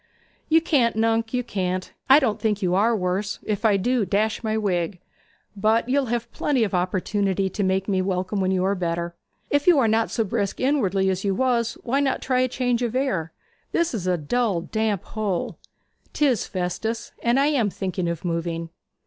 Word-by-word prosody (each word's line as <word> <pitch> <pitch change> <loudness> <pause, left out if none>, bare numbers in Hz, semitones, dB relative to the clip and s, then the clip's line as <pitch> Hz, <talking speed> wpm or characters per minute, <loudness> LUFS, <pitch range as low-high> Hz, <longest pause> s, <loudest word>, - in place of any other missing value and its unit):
'You 325 +1 +5
can't, 270 -9 +2
nunc, 225 0 +1
you 250 -1 0
can't. 185 -4 -3 0.2
I 270 - +9
don't 225 -8 +1
think 210 -2 +1
you 180 -1 +1
are 220 +5 +3
worse 190 +2 -1
if 210 0 -2
I 210 -3 +4
do, 245 +4 +1
dash 210 +4 0
my 220 0 0
wig. 185 -3 -1 0.6
But 220 +3 +2
you'll 275 0 +2
have 235 0 -2
plenty 270 -5 +1
of 200 - -2
opportunities 190 +1 0
to 205 - -2
make 190 0 0
me 190 -3 +1
welcome 185 +1 -1
when 185 - +1
you 185 -1 +1
are 195 - +2
better. 170 -2 -2 0.4
If 285 +2 +1
you 350 -4 +7
are 255 -5 +4
not 220 +1 +2
so 225 - 0
brisk 200 -1 -2
inwardly 200 -9 +2
as 185 0 -3
you 195 -2 0
was, 235 -1 +1
why 260 +3 +1
not 275 -2 +1
try 255 -1 +2
change 245 -1 -1
of 240 -1 -1
air? 255 - -1 0.4
This 340 -3 +1
is 190 -6 -3
a 180 -1 +2
dull, 195 +3 0
damp 215 0 -1
hole.' 205 -5 -3 0.5
''Tis, 270 -7 +1
Festus; 190 +5 -3
and 235 +3 +2
I 285 +2 +3
am 235 -7 +2
thinking 185 -2 -3
of 170 +1 -4
moving.' 165 -1 -2
210 Hz, 190 wpm, -24 LUFS, 185-240 Hz, 0.6 s, I